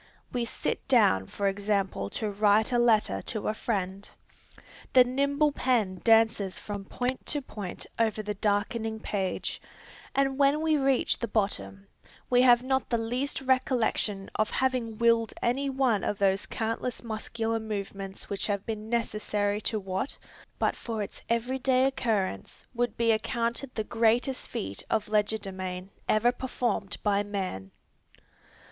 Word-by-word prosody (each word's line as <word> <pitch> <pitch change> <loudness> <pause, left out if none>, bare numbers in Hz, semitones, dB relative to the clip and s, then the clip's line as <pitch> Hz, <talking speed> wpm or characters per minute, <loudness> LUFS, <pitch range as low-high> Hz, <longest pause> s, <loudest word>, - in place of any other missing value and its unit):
We 245 -1 0
sit - - -3
down 200 - +4
for 200 - -2
example 195 - -1
to 215 - -3
write 210 +3 +3
a 240 - +3
letter 215 - +3
to 215 - -4
a - - +1
friend. 200 -4 -3 0.8
The 255 - +9
nimble 280 +4 +1
pen 225 -10 0
dances 220 -4 +4
from 205 -2 -6
point 250 +5 -3
to 295 - +1
point 210 -8 -7
over 220 -1 +1
the 210 0 -2
darkening 220 +2 -1
page, 195 -3 -3 0.5
and 270 0 +1
when 285 +2 +4
we 315 -1 +3
reach 270 -3 +2
the 235 - -2
bottom, 100 - -1 0.5
we 245 0 +6
have 245 -1 +6
not 265 0 0
the 235 - +2
least 245 +5 -1
recollection 250 -6 +1
of 215 - +1
having 250 -4 0
willed 230 -1 +3
any 270 +4 0
one 260 -6 +1
of 205 - -1
those 195 0 +1
countless 225 +3 -2
muscular 225 0 -2
movements 200 -3 -5
which 200 - -2
have 200 -2 -1
been 220 -1 -5
necessary 210 -3 0
to 215 - 0
what, 190 +7 -3 0.4
but - - +1
for 225 -3 -4
its 200 - -9
every 240 +3 0
day 260 0 +3
occurrence, 220 - -1
would 240 -2 -1
be 230 -1 +3
accounted 235 +3 -1
the 220 - -1
greatest 235 +4 +1
feat 95 +1 -3
of 220 -2 0
legerdemain 195 -3 -1 0.2
ever 225 +3 +4
performed 240 -6 -2
by 205 -1 +3
man! 190 - -4
220 Hz, 145 wpm, -28 LUFS, 200-245 Hz, 0.8 s, The